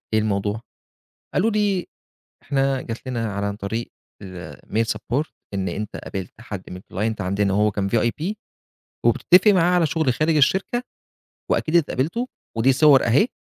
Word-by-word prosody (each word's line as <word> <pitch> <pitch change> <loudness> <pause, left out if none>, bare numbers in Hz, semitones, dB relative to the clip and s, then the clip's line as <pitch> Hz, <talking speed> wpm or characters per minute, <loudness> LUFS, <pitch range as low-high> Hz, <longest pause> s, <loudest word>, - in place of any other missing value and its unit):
إيه 110 - +4
الموضوع؟ 105 0 -1 0.7
قال - - +3
له 225 - +3
دي 205 -4 0 0.5
إحنا 135 -1 +1
جات 115 0 -7
لنا 115 -4 -2
ع 100 0 -1
عن 100 - -4
طريق 110 +4 -4 0.3
الmail 90 - -4
support 120 +8 -2 0.3
إن 95 -1 -1
أنت 105 0 -5
قابلت 95 -3 -6
حد 100 -5 -7
من 90 0 -7
الclient 105 +4 -3
عندنا 100 +1 0
وهو 105 +2 +3
كان 100 -1 -2
VIP 120 - 0 0.7
وبتتفق 185 +4 +5
معاه 180 -2 +3
على 175 -2 +4
شغل 155 -4 +1
خارج 155 +5 +1
الشركة، 190 - +2 0.7
وأكيد 160 - +1
اتقابلتوا، 170 - +1 0.3
ودي 120 +4 +4
صور 140 0 +6
أهي، 130 - +4
120 Hz, 150 wpm, -23 LUFS, 100-160 Hz, 0.7 s, صور